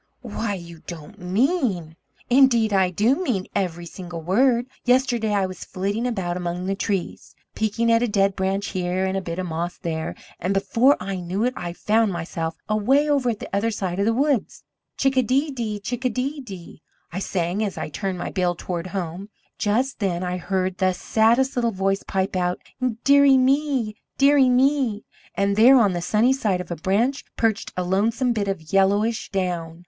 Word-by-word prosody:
"Why, 205 -3 -3
you 170 -3 -10
don't 160 -4 -9
mean 190 - 0 0.2
" - - -33
"Indeed 240 -5 +5
I 190 -2 +3
do 215 +9 +2
mean 210 - -1
it, - - -24
every 175 -4 -2
single 175 -1 -8
word. 235 +7 +3 0.2
Yesterday 245 -3 +2
I 200 -2 +2
was 185 -1 -7
flitting 200 +6 -2
about 190 -7 -2
among 180 0 -3
the 195 - 0
trees, 195 -2 -3 0.2
peeking 220 +2 0
at 230 0 +4
a 245 - +2
dead 195 -2 +2
branch 195 +1 -1
here, 185 +1 -1
and 190 0 -1
a 195 - -1
bit 170 -2 -5
of 185 - -2
moss 170 +1 -3
there, 160 -1 -4 0.2
and 185 +3 -1
before 235 +7 +3
I 190 +1 -4
knew 180 +4 -2
it 250 +1 +1
I 175 -1 -5
found 215 +3 +1
myself 165 -1 -4
away 255 +8 +2
over 280 -4 +2
at 225 - -1
the - - -6
other 210 +3 +1
side 190 -4 -3
of 200 - +2
the 225 - +3
woods! 275 -3 0 0.3
'Chickadee 270 +2 +2
dee 230 -5 -3
dee, - - -10
chickadee 255 +6 -2
dee - - -6
dee!' 190 - -10 0.3
I 185 - -2
sang, 185 +1 -1
as 200 -4 -3
I - - -4
turned 190 +4 -3
my - - -4
bill 180 -2 0
toward 175 0 -4
home. 185 +1 -5 0.3
Just 245 +6 0
then 185 -4 -1
I 180 0 -2
heard 185 0 -2
the 185 -1 +2
saddest 230 +7 +2
little 235 -2 +1
voice 195 0 0
pipe 190 0 -2
out: 180 -1 0 0.5
'Dear 280 0 +6
ie 270 -1 +6
me! 260 -4 +1 0.2
Dear 280 +1 +5
ie 260 -2 +5
me!' 250 -4 +2 0.3
and 200 0 +1
there 245 +5 +7
on 205 -5 +3
the 175 - -2
sunny 220 +8 +3
side 210 -9 0
of 180 - -7
a - - -1
branch 210 - 0
perched 225 -2 0
a 180 - 0
lonesome 225 +7 +1
bit 205 -3 -1
of 170 -5 -5
yellowish 205 +4 +2
down. 175 -4 -3
200 Hz, 195 wpm, -23 LUFS, 180-240 Hz, 0.5 s, there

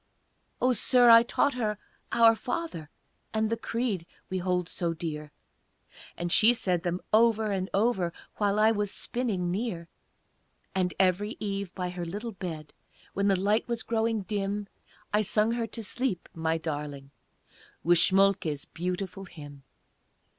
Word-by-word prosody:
"O 255 0 +3
Sir, 245 0 +5
I 230 0 +10
taught 280 +4 +1
her 215 -4 -1 0.3
'Our 230 -1 +6
Father;' 245 - -4 0.5
And 220 0 +1
the - - +2
'Creed' 230 -7 -2 0.2
we 190 - -1
hold 180 -1 0
so 170 -2 -2
dear, 155 -3 -5 0.9
And 175 0 -3
she 230 +6 +6
said 180 -6 0
them 175 +1 -2
over 220 -1 +4
and 190 -1 -2
over 195 -4 +1 0.3
While 205 -1 +1
I 215 +1 +5
was 210 -2 -1
spinning 200 -7 -2
near; 185 -4 -3 0.8
And 185 -2 +1
every 195 +3 +2
eve, 200 -3 -3
by 180 -2 -3
her 180 -1 -5
little 205 +7 -5
bed, 165 -6 -7 0.4
When 200 +1 +1
the 195 -2 +3
light 205 +3 +1
was 235 -1 -2
growing 225 -2 0
dim, 205 0 -2 0.5
I 210 - +4
sung 215 +2 +2
her 235 -1 -1
to 225 +1 -7
sleep, 225 -3 -2
my 160 0 0
darling! 145 -3 -5 0.7
With 175 +1 +5
Schmolke's 190 -7 +3
beautiful 180 +2 -4
hymn." 145 -5 -11
195 Hz, 145 wpm, -28 LUFS, 175-225 Hz, 0.9 s, I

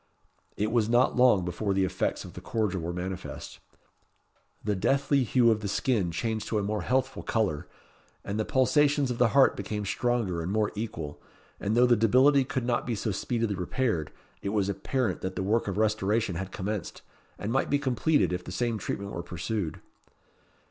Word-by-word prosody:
It 105 +2 0
was 115 -2 +2
not 120 +2 +3
long 125 -8 +5
before 95 +3 -1
the 95 -1 +3
effects 95 - -2
of - - -10
the - - -9
cordial 105 -5 -1
were 85 +1 -3
manifest. 90 +1 -6 1.0
The 105 -1 0
deathly 135 +6 +2
hue 120 0 +4
of 110 - +1
the 105 - -4
skin 105 -3 +1
changed 110 +5 -2
to 110 - 0
a 105 - 0
more 105 +1 -1
healthful 130 +5 0
colour, 100 - -1 0.6
and 100 +1 -3
the - - +2
pulsations 140 +2 +2
of 120 - -4
the 125 - +5
heart 135 +3 +5
became 105 +1 -4
stronger 115 -6 0
and 85 +3 -3
more 105 0 +1
equal; 105 -9 -5 0.4
and 105 +3 0
though 125 - +6
the 120 -1 +5
debility 130 +6 +5
could 130 -1 -3
not 120 0 0
be 120 - 0
so 110 +1 -2
speedily 115 +2 -1
repaired, 95 - -1 0.3
it 100 - -2
was 100 -1 0
apparent 115 +5 -1
that 95 - -4
the 95 - -2
work 110 +4 +1
of 100 -1 -2
restoration 110 -1 +1
had 95 +3 -5
commenced, 105 -1 -4 0.3
and 105 - -4
might 135 - +1
be 145 - +3
completed 145 - +1
if 90 0 -3
the - - -8
same 115 +3 -1
treatment 100 +1 -4
were 85 - -4
pursued. 90 0 -4
110 Hz, 190 wpm, -28 LUFS, 95-125 Hz, 1.0 s, though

